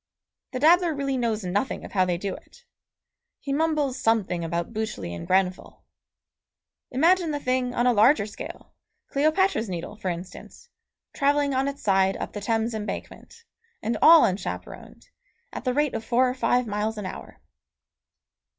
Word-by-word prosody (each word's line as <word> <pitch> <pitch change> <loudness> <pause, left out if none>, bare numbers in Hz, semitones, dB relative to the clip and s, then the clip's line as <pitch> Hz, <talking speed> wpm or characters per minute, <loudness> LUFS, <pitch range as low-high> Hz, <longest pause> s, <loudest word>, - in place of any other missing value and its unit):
The 255 - -3
dabbler 335 +2 +4
really 275 -1 -1
knows 230 -4 -1
nothing 200 +8 -2
of - - -10
how 185 -2 +2
they 175 -1 -1
do 195 +1 -4
it. 485 - -15 0.7
He 280 - -4
mumbles 300 -3 0
something 205 -6 +1
about 170 +6 -3
Bütschli 215 - -4
and 85 - -8
Grenfell. 185 -1 0 1.1
Imagine 335 +6 +3
the 295 -1 -2
thing 255 -2 -1
on 240 - +1
a 250 - +4
larger 220 +1 +4
scale, 210 - -9 0.4
Cleopatra's 310 - +1
Needle, 180 +3 -5
for 205 -3 -4
instance, 180 - -8 0.4
travelling 285 0 +1
on 265 +1 +1
its 280 0 -5
side 190 -1 +2
up - - -6
the 205 - -5
Thames 225 +2 0
Embankment, 220 - -7 0.4
and 230 - -1
all 325 0 +8
unchaperoned, 190 - -5 0.4
at - - -7
the 255 - +1
rate 295 -1 +1
of 225 - -3
four 245 +3 +2
or 250 - -1
five 250 -1 +1
miles 215 +1 -2
an 210 - -5
hour. 185 - -8
235 Hz, 160 wpm, -25 LUFS, 200-280 Hz, 1.1 s, all